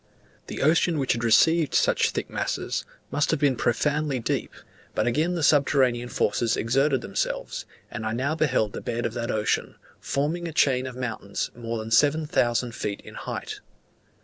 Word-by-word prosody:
The -, -, -4 dB
ocean 165 Hz, +2 st, +3 dB
which 135 Hz, -2 st, +1 dB
received 140 Hz, +8 st, +3 dB
such -, -, +3 dB
thick -, -, -3 dB
masses, -, -, -2 dB, 0.3 s
must 145 Hz, -, +1 dB
have -, -, +1 dB
been 140 Hz, -3 st, +3 dB
profoundly 145 Hz, +4 st, 0 dB
deep; 115 Hz, -, -2 dB, 0.4 s
but -, -, +1 dB
again 155 Hz, +9 st, +1 dB
the 165 Hz, -, -2 dB
subterranean 130 Hz, -4 st, +3 dB
forces 120 Hz, -1 st, +1 dB
exerted 135 Hz, +3 st, +2 dB
themselves, 100 Hz, -, -3 dB, 0.2 s
and 110 Hz, -, -5 dB
I 110 Hz, -, -1 dB
now 130 Hz, +6 st, -1 dB
beheld 130 Hz, -9 st, +1 dB
the -, -, -5 dB
bed 120 Hz, 0 st, -3 dB
of 110 Hz, -, -2 dB
that 120 Hz, -1 st, -3 dB
ocean, 105 Hz, -1 st, 0 dB, 0.2 s
forming 160 Hz, +5 st, -1 dB
a 165 Hz, -, -6 dB
chain 130 Hz, -3 st, +2 dB
of 130 Hz, -, -7 dB
mountains 115 Hz, -5 st, -4 dB
more 115 Hz, -1 st, -4 dB
than 110 Hz, 0 st, -6 dB
seven 150 Hz, +5 st, +4 dB
thousand 120 Hz, -6 st, +1 dB
feet 100 Hz, -3 st, -4 dB
in -, -, -12 dB
height. -, -, -6 dB
130 Hz, 170 wpm, -25 LUFS, 115-150 Hz, 0.4 s, seven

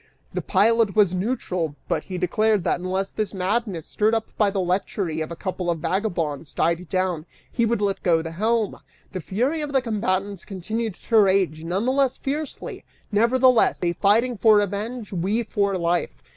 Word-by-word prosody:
The -, -, -2 dB
pilot 220 Hz, +1 st, +3 dB
was 200 Hz, -4 st, +4 dB
neutral, 180 Hz, -, -2 dB
but -, -, -1 dB
he 185 Hz, -, -5 dB
declared 210 Hz, +3 st, +1 dB
that -, -, 0 dB
unless 190 Hz, +2 st, -2 dB
this 215 Hz, -2 st, -3 dB
madness, 195 Hz, -2 st, -1 dB
stirred 215 Hz, +2 st, +1 dB
up 225 Hz, -1 st, -1 dB
by 210 Hz, -2 st, +3 dB
the 195 Hz, 0 st, -2 dB
lechery 180 Hz, -2 st, -1 dB
of 155 Hz, -, -3 dB
a 170 Hz, -, -6 dB
couple 180 Hz, 0 st, -3 dB
of 170 Hz, -, +1 dB
vagabonds, 165 Hz, -5 st, -2 dB
died 170 Hz, +1 st, 0 dB
down, 185 Hz, -4 st, -1 dB, 0.2 s
he 235 Hz, -2 st, +1 dB
would 230 Hz, -1 st, 0 dB
let 200 Hz, -1 st, 0 dB
go 165 Hz, -3 st, +2 dB
the 165 Hz, -, -5 dB
helm! 215 Hz, +4 st, 0 dB, 0.3 s
The 185 Hz, -, -4 dB
fury 250 Hz, -, -1 dB
of 295 Hz, -1 st, -4 dB
the 270 Hz, -, +5 dB
combatants 200 Hz, -4 st, -1 dB
continued 215 Hz, +2 st, -4 dB
to 225 Hz, -2 st, +2 dB
rage 190 Hz, -6 st, +2 dB
none 185 Hz, +6 st, -1 dB
the 255 Hz, -, +2 dB
less 270 Hz, -1 st, +1 dB
fiercely, 290 Hz, +2 st, -5 dB, 0.3 s
nevertheless, 245 Hz, +3 st, +4 dB
they 175 Hz, -1 st, 0 dB
fighting 220 Hz, +7 st, +2 dB
for 220 Hz, +1 st, +6 dB
revenge, 205 Hz, +3 st, -1 dB
we 195 Hz, +7 st, 0 dB
for 200 Hz, -3 st, 0 dB
life. 170 Hz, 0 st, -1 dB
200 Hz, 180 wpm, -23 LUFS, 180-225 Hz, 0.3 s, for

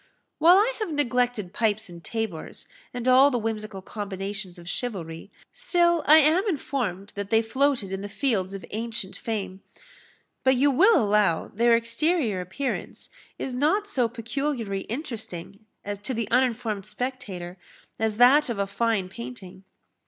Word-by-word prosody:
"While 340 Hz, +4 st, +7 dB
I 445 Hz, +5 st, +3 dB
have 430 Hz, -6 st, -2 dB
neglected 245 Hz, -, 0 dB
pipes 215 Hz, 0 st, 0 dB
and 170 Hz, -2 st, -12 dB
tabors, 220 Hz, -8 st, -5 dB, 0.3 s
and 245 Hz, 0 st, -4 dB
all 260 Hz, +2 st, +7 dB
the 250 Hz, -, 0 dB
whimsical 215 Hz, -3 st, -4 dB
combinations 195 Hz, -2 st, -5 dB
of 170 Hz, -1 st, -13 dB
chivalry, 180 Hz, -6 st, -4 dB, 0.2 s
still 345 Hz, -8 st, +2 dB
I 310 Hz, -, +9 dB
am 315 Hz, +5 st, +5 dB
informed 240 Hz, -, -3 dB
that 200 Hz, -1 st, -5 dB
they 225 Hz, 0 st, +3 dB
floated 260 Hz, -3 st, 0 dB
in 195 Hz, 0 st, -3 dB
the 205 Hz, -, -6 dB
fields 200 Hz, -6 st, -1 dB
of 190 Hz, -4 st, -8 dB
ancient 225 Hz, -2 st, -4 dB
fame. 195 Hz, -4 st, -4 dB, 0.8 s
But 260 Hz, 0 st, +4 dB
you 280 Hz, +3 st, +3 dB
will 390 Hz, -, +5 dB
allow 205 Hz, -6 st, +2 dB
their 235 Hz, +2 st, +3 dB
exterior 230 Hz, -, +1 dB
appearance 190 Hz, +10 st, -4 dB, 0.3 s
is 260 Hz, -, -4 dB
not 310 Hz, +11 st, +2 dB
so 255 Hz, -, 0 dB
peculiarly 235 Hz, -3 st, -3 dB
interesting 220 Hz, -, -6 dB, 0.3 s
to 235 Hz, +5 st, -3 dB
the 230 Hz, -1 st, -3 dB
uninformed 235 Hz, -5 st, +1 dB
spectator 200 Hz, -9 st, -5 dB, 0.4 s
as 220 Hz, -1 st, 0 dB
that 260 Hz, +4 st, +6 dB
of 235 Hz, -, -2 dB
a 200 Hz, -, 0 dB
fine 200 Hz, -1 st, 0 dB
painting. 180 Hz, +6 st, -9 dB
225 Hz, 145 wpm, -25 LUFS, 195-265 Hz, 0.8 s, I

